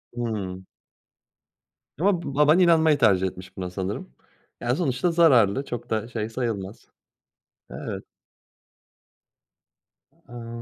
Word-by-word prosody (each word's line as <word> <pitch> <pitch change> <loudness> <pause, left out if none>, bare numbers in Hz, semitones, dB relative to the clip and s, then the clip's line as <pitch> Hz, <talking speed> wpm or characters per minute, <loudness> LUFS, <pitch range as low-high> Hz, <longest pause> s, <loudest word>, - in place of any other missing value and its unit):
Hıı. 100 -6 -4 1.4
Ama 180 0 +2
b 140 - -6
baban 150 +4 +5
inanmayı 160 -4 +5
tercih 95 -8 +3
etmiş 95 +1 -10
buna 90 -1 -4
sanırım. 95 -8 -5 0.5
Ya, 120 +1 0
sonuçta 160 0 0
zararlı, 135 - +4
çok 120 0 -6
da, 110 +1 -1
şey 115 -2 -4
sayılmaz. 110 -5 -4 0.8
Evet. - - -6 2.2
Amm. 115 -1 -8
120 Hz, 100 wpm, -25 LUFS, 100-150 Hz, 2.2 s, baban